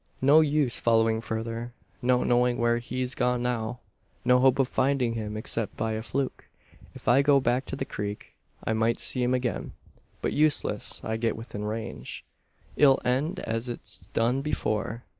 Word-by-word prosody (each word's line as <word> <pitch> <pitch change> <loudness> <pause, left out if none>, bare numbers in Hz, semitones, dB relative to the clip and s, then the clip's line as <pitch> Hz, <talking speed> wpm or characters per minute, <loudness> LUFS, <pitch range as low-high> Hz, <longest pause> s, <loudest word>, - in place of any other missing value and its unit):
"No 145 +4 +7
use 145 -5 +2
following 115 -1 +3
further! 115 +1 -4 0.3
No 125 0 +3
knowing 125 0 +2
where 120 0 +2
he's 125 +1 -3
gone 125 0 0
now! 120 0 -2 0.4
No 125 0 +5
hope 130 0 +4
of 135 -2 +2
finding 130 -3 +1
him 105 -2 -4
except 110 0 -3
by 110 +1 -1
a 110 0 -2
fluke! 130 +3 -3 0.5
If - - -13
I 135 +3 +6
go 140 -1 +5
back 125 +1 +1
to - - -4
the 135 - -3
creek 105 -3 -6 0.3
I 110 - 0
might 115 +1 +1
see 125 - -1
him 125 +1 +2
again; 125 -1 -2 0.5
but - - 0
unless 150 -1 +1
I 110 0 -2
get 115 -1 -1
within 110 -2 -6
range, 110 +1 -5 0.5
it'll 135 -3 +5
end 145 +9 0
as 115 +2 -3
it's 120 - -7
done 120 +4 +1
before. 115 -5 -2
120 Hz, 170 wpm, -27 LUFS, 115-130 Hz, 0.5 s, No